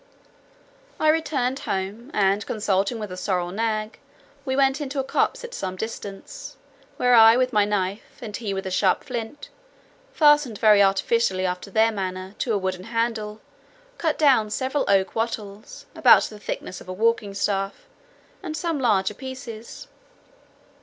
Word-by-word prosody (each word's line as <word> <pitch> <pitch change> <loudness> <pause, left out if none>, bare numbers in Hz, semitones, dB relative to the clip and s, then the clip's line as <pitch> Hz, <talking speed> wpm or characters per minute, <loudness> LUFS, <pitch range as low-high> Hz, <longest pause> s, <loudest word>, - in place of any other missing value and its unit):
I 310 - +3
returned 285 -5 0
home, 200 +6 -4
and 200 0 +2
consulting 205 +1 0
with 210 -2 -5
the 185 - -6
sorrel 180 -2 -1
nag, 215 +1 -2 0.5
we 260 -1 -1
went 270 +2 +2
into 285 0 -5
a - - 0
copse 270 - 0
at 485 0 -8
some 185 - -4
distance, 220 - -7 0.4
where 250 0 +3
I 225 0 +8
with 255 0 +1
my 210 -1 +4
knife, 200 0 -3
and 215 -4 -7
he 215 -4 -4
with 195 0 -3
a 190 - -4
sharp 185 0 +2
flint, 240 +3 -6 0.6
fastened 295 -7 +4
very 210 -2 +5
artificially 195 0 +2
after 180 +2 -3
their 220 +3 +3
manner, 185 -2 -5
to 240 - -1
a - - +2
wooden 185 -1 -3
handle, 225 -2 -2 0.6
cut 320 -3 0
down 260 -8 +4
several 265 +6 -1
oak 195 -1 +2
wattles, 215 -2 -5
about - - +6
the 210 - -7
thickness 185 - -6
of - - -12
a - - -3
walking 215 -1 0
staff, 195 - -2 0.6
and 315 -5 -5
some 330 -2 -2
larger 210 -5 +2
pieces. 240 -2 -9
220 Hz, 155 wpm, -24 LUFS, 195-255 Hz, 0.6 s, I